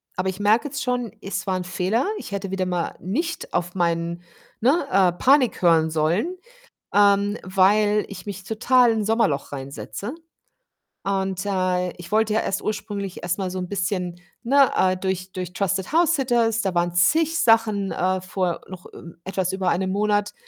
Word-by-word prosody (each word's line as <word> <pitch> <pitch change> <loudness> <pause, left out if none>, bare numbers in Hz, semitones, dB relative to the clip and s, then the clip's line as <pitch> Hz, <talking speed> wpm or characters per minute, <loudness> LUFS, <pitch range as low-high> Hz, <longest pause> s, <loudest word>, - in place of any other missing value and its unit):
aber 185 +1 -1
ich 190 +1 -6
merke 215 +6 +3
jetzt 285 +1 -5
schon, 245 -3 -1
es 190 0 -4
war 190 - +1
'n 185 - -4
Fehler. 185 +6 0
Ich - - -8
hätte 195 -1 -4
wieder 190 -1 -1
mal 175 -2 -2
nicht 320 - -3
auf 175 0 -1
meinen 170 -1 -1 0.4
ne, 275 +5 +2
äh, 190 -2 +4
Panik 255 +8 +3
hören 165 -3 +4
sollen, 170 - 0 0.6
ähm, 205 0 +4
weil 205 +3 +3
ich 200 - -9
mich 190 -2 -6
total 240 +3 +3
in 225 - 0
'n - - -2
Sommerloch 220 -12 +1
reinsetze 140 - -6 0.9
und, 190 -1 -2
äh, 185 -2 0
ich 175 +2 -11
wollte 215 0 +2
ja 220 - +3
erst 190 - -2
ursprünglich 205 -3 -4
erst 175 +1 -1
mal 190 -1 -2
so 185 - -4
'n 180 - -4
bisschen, 180 -2 -2 0.2
ne, 275 +2 +4
äh, 185 0 +2
durch 185 0 -3
durch 180 -2 -6
TrustedHousesitters, 230 - +1
da 190 -2 -1
waren 175 0 +1
zig 325 - +3
Sachen, 220 - +3
äh, 185 +1 0
vor 185 -2 -2
noch 185 -1 -10
ü 170 0 -11
etwas 190 -1 -2
über 190 -1 0
einem 185 +2 0
Monat 205 +1 0
195 Hz, 175 wpm, -23 LUFS, 180-220 Hz, 0.9 s, äh